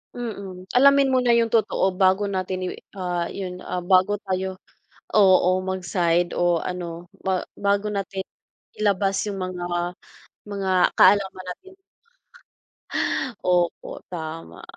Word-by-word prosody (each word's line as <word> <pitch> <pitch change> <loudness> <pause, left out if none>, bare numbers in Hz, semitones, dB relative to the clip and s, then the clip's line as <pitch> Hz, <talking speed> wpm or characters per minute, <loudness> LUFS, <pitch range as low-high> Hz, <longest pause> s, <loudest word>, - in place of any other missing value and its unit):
Mm, 200 -6 -6
alamin 275 +1 +5
muna 250 -2 +3
'yung 230 -1 +2
totoo 215 -3 +2
bago 190 +2 +3
natin 185 -1 -2
i 185 - -2 0.3
ah, 175 -2 -2
'yun 180 -2 -6
ah, 180 -1 -4
bago 185 +2 +4
tayo, 190 0 -2 0.6
oo 190 -3 +6 0.2
mag-side 175 -2 0
o 175 -1 +2
ano 175 -1 -5 0.2
ba 190 -1 +1 0.2
bago 200 +1 +1
natin 195 -1 -3 0.6
ilabas 200 -2 +1
'yung 200 -2 -4
mga 185 -1 -4 0.8
mga 200 -2 -3 0.3
kaalaman 190 -1 +4
natin. 380 - -13 1.7
Opo, 175 -1 0
tama. 160 - -7
190 Hz, 115 wpm, -24 LUFS, 180-205 Hz, 1.7 s, oo